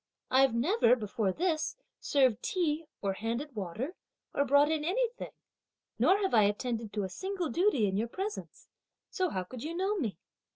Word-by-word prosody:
I've 265 -2 +5
never, 255 - +4
before 210 -3 -1
this, 320 - -1 0.2
served 260 -6 +2
tea, 325 -4 -1 0.2
or 195 -1 +1
handed 235 +7 -4
water, 215 - -4 0.4
or 280 - +2
brought 285 +3 +5
in 310 -2 0
anything; 470 +8 -1 0.7
nor 385 - +5
have 385 - 0
I 215 -3 +6
attended 225 +1 -2
to 205 -1 -1
a - - -1
single 370 - -3
duty 345 - +3
in 190 0 -1
your 225 +3 0
presence, 390 - -6 0.4
so 370 -4 0
how 185 -9 -2
could 235 +6 -9
you 320 +5 -4
know 390 +3 +1
me?" 220 - -2
270 Hz, 170 wpm, -31 LUFS, 220-355 Hz, 0.7 s, I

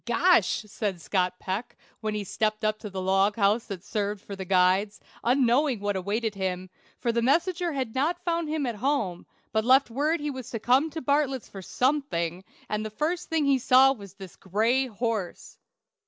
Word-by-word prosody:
"Gosh!" 240 - +3
said 200 -3 -3
Scott 180 +1 -1
Peck, 195 +6 -5 0.2
when 215 -1 -3
he 210 - -2
stepped 215 +2 -1
up 215 0 0
to 210 - -7
the 190 -1 -5
log 195 +2 +2
house 215 +2 +2
that 190 -4 -6
served 205 -1 -2
for 200 - -6
the 190 -1 -6
guides, 190 +3 +2 0.2
unknowing 255 +1 +3
what 205 0 -1
awaited 205 +4 -1
him, 185 -1 -3 0.3
for 235 - 0
the 235 0 0
messenger 340 +6 +1
had 260 -5 -3
not 340 +7 -1
found 335 -2 0
him 305 -2 -1
at 235 -3 -3
home, 225 -8 -1 0.2
but 220 0 +1
left 260 +1 +4
word 300 +7 0
he 295 0 -3
was 260 -3 -7
to 230 - -4
come 260 +8 +3
to 320 +1 -6
Bartlett's 280 -2 0
for 195 - -9
something, 190 - -1 0.2
and 210 0 -2
the 215 - -4
first 315 +11 -2
thing 320 -2 +1
he 275 -1 +3
saw 260 +2 +6
was 200 -6 -12
this 190 -3 -11
gray 225 +8 +1
horse. 220 -5 -4
225 Hz, 190 wpm, -27 LUFS, 200-275 Hz, 0.3 s, saw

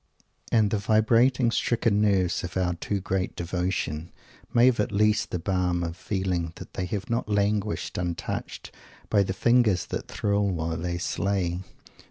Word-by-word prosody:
_ - - -31 0.3
And 110 -3 +3
the 110 - +1
vibrating, 115 +4 +3
stricken 115 -3 +1
nerves 95 -4 +2
of 90 +1 -4
our 90 -1 +1
too 100 +4 -3
great 95 0 -2
devotion 85 -2 -2 0.4
may 120 +1 +5
have 130 -3 +4
at 105 - +1
least 105 +1 +2
the - - -2
balm 90 -1 0
of 85 0 -4
feeling 90 -4 -2
that - - -11
they 90 - -3
have 100 +1 -4
not 115 -2 -1
languished 105 -3 0
untouched 85 -2 -4 0.4
by 105 - +5
the 95 - 0
fingers 120 -4 +3
that - - -5
thrill 100 0 0
while 80 -2 -2
they 85 +1 -2
slay. 90 -1 -1
95 Hz, 165 wpm, -26 LUFS, 90-105 Hz, 0.4 s, may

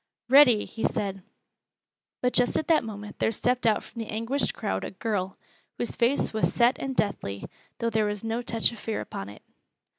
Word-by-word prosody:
"Ready!" 255 -5 +7
he 225 - -7
said. 195 -1 -1 1.0
But 250 - +2
just 245 0 +3
at 315 - -2
that 320 - +5
moment 210 -2 -8
there - - +2
stepped 245 +2 +1
out 215 - +2
from 230 - -8
the 225 - -5
anguished 230 +6 -1
crowd 95 0 -2
a - - -3
girl, 195 -2 -3 0.4
whose 240 - -2
face 240 +2 +2
was 220 - +1
set 240 +2 +3
and 270 -1 -3
deathly, 100 - -1 0.3
though 230 -1 -1
there 215 -1 +2
was 205 0 -3
no 225 +1 -1
touch 230 -2 +1
of 235 - -10
fear 220 0 -3
upon 100 +1 -6
it. 105 - -13
225 Hz, 190 wpm, -27 LUFS, 205-245 Hz, 1.0 s, Ready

